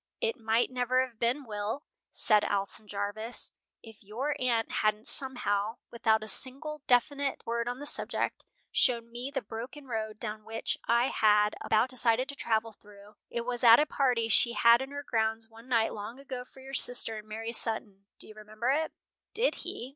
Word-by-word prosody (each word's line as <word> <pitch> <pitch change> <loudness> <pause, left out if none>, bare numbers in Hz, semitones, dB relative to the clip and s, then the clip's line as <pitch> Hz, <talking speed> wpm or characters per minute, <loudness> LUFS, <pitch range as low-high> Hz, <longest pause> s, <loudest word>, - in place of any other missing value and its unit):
"It 465 -2 0
might 225 0 +1
never 255 +1 +1
have 235 -4 -17
been, 245 +5 0
Will," 215 +5 -4 0.3
said 210 -2 +3
Alson 205 +1 -1
Jarvis, 205 +3 -3 0.3
"if 225 -2 -13
your 250 +9 -3
aunt 235 -3 0
hadn't 215 +1 0
somehow, 225 -5 0
without 220 -2 +2
a - - -7
single 280 +7 0
definite 280 +3 +1
word 235 +1 -1
on 245 - -4
the 290 - -8
subject, 290 - 0 0.3
shown 235 -2 +1
me 245 +3 -5
the 270 -3 -3
broken 245 +7 -8
road 220 -3 -4
down 215 -1 -5
which 225 +1 -3
I 235 +2 +3
had 210 -1 +3
about 220 +4 +2
decided 250 0 +2
to 280 - -5
travel 225 -3 -1
through 205 0 -17 0.2
It 235 - -3
was 245 +1 -1
at 230 -1 +9
a 300 - +4
party 250 -6 +1
she 235 +2 +3
had 235 +1 +6
in 265 - -5
her 285 0 -6
grounds 225 -2 -1
one 230 +2 -16
night 230 -3 +2
long 220 +5 -7
ago 260 -2 -7
for 265 - -17
your 270 +1 -11
sister 245 -4 +3
and 215 0 -10
Mary 225 +2 -5
Sutton. 205 -4 +2
Do - - -8
you 215 - -12
remember 215 +3 -3
it?" 315 +3 0 0.4
Did 480 +3 +2
he? 245 - -6
230 Hz, 185 wpm, -30 LUFS, 215-255 Hz, 0.4 s, at